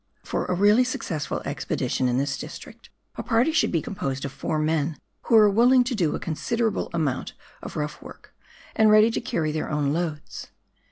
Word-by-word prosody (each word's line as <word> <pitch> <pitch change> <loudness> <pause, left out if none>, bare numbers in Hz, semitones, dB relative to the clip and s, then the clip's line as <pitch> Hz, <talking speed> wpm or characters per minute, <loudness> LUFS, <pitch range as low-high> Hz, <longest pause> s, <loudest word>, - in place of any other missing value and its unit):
For - - -2
a 180 - -1
realh' 205 +6 +5
successful 170 - -3
expedition 130 - -2
in 125 0 +1
this 140 +1 0
district, - - -10 0.3
a - - -2
party 240 +6 +2
should 315 - +2
be 165 -4 0
composed 135 -8 -4
of 140 - -4
four 155 - -3
men, 155 0 0 0.3
who 230 - +3
are 215 -1 +8
willing 245 +5 +5
to 250 +1 -3
do 175 -9 0
a - - -4
con 165 - -4
siderable 230 +5 -1
amount 150 -6 -2 0.3
of - - -8
rough 150 0 -4
work, - - -13 0.4
and 220 -1 +5
ready 215 +2 +6
to - - -2
carry 160 -9 -1
their 155 0 -3
own 145 -2 0
loads. 155 -3 -4
170 Hz, 190 wpm, -25 LUFS, 150-225 Hz, 0.4 s, are